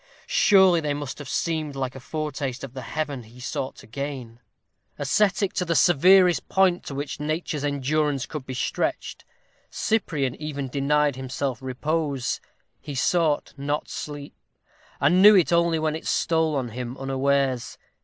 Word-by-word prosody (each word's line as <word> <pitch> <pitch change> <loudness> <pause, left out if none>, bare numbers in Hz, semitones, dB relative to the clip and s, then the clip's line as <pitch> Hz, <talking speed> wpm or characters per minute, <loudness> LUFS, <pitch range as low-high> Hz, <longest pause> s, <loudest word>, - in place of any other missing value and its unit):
Surely 190 -4 +5
they 145 -2 -1
must 145 -1 -6
have 145 -3 -8
seemed 155 -3 -2
like 130 -2 -3
a 135 - -9
foretaste 140 -2 -4
of 135 -3 -7
the 130 - -6
heaven 145 -2 -4
he 115 +2 -16
sought 130 +1 -4
to - - -14
gain! 125 -2 -6 0.6
Ascetic 200 -1 +1
to 180 - 0
the 170 -1 -1
severest 180 +2 +5
point 190 -2 +3
to 140 - -6
which 145 +1 -4
nature's 155 -1 -2
endurance 145 0 0
could 150 -4 -6
be 130 0 -7
stretched, 130 - -2 0.4
Cyprian 150 - -1
even 145 -3 -4
denied 145 +1 +1
himself 130 -1 -3
repose. 140 +1 -2 0.4
He 145 - -7
sought 155 +2 +1
not 145 +2 -2
sleep, 145 -1 -7 0.7
and 180 +2 +4
knew 210 +1 +9
it 175 -2 +4
only 170 -1 +3
when 155 -1 0
it 160 - -7
stole 160 -2 +1
on 130 -3 -2
him 125 +2 -6
unawares. 135 -1 0
145 Hz, 155 wpm, -25 LUFS, 135-160 Hz, 0.7 s, knew